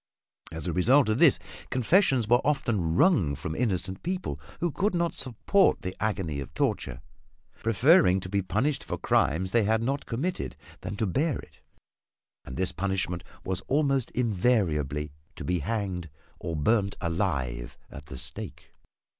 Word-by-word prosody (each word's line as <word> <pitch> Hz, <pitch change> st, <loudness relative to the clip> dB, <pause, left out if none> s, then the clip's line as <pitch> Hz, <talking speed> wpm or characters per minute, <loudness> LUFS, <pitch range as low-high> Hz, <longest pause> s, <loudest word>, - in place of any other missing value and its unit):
As 80 Hz, +1 st, -5 dB
a 85 Hz, -, -1 dB
result 125 Hz, -, +4 dB
of 110 Hz, +3 st, +1 dB
this, 165 Hz, -6 st, +6 dB, 0.3 s
confessions 130 Hz, -, +3 dB
were 120 Hz, +2 st, +4 dB
often 115 Hz, -, 0 dB
wrung 90 Hz, -, +4 dB
from 80 Hz, -, -5 dB
innocent 95 Hz, -4 st, -1 dB
people, 180 Hz, -, -3 dB, 0.2 s
who 175 Hz, -1 st, 0 dB
could 200 Hz, +5 st, 0 dB
not 170 Hz, -1 st, +1 dB
support 140 Hz, -, +2 dB
the 90 Hz, 0 st, -4 dB
agony 95 Hz, -8 st, -1 dB
of 70 Hz, -, -7 dB
torture, 65 Hz, 0 st, -1 dB, 0.6 s
preferring 115 Hz, -, +5 dB
to 95 Hz, -, -6 dB
be 100 Hz, +1 st, 0 dB
punished 110 Hz, -, 0 dB
for -, -, -4 dB
crimes 90 Hz, +5 st, +1 dB
they 115 Hz, 0 st, +3 dB
had 110 Hz, +2 st, +1 dB
not 135 Hz, +4 st, -2 dB
committed 165 Hz, +10 st, -3 dB, 0.3 s
than -, -, -5 dB
to 110 Hz, -, 0 dB
bear 140 Hz, -, 0 dB
it. -, -, -14 dB, 0.8 s
And 65 Hz, -, -7 dB
this 95 Hz, +1 st, 0 dB
punishment 90 Hz, -2 st, -2 dB, 0.2 s
was 95 Hz, -1 st, -2 dB
almost 140 Hz, -3 st, +1 dB
invariably 90 Hz, -, 0 dB, 0.2 s
to -, -, -7 dB
be 90 Hz, 0 st, 0 dB
hanged 95 Hz, -2 st, -3 dB, 0.3 s
or 85 Hz, -, -4 dB
burned 100 Hz, +6 st, +1 dB
alive 60 Hz, -7 st, -2 dB
at 75 Hz, -1 st, -10 dB
the 70 Hz, -, -8 dB
stake. -, -, -8 dB
100 Hz, 155 wpm, -28 LUFS, 85-130 Hz, 0.8 s, this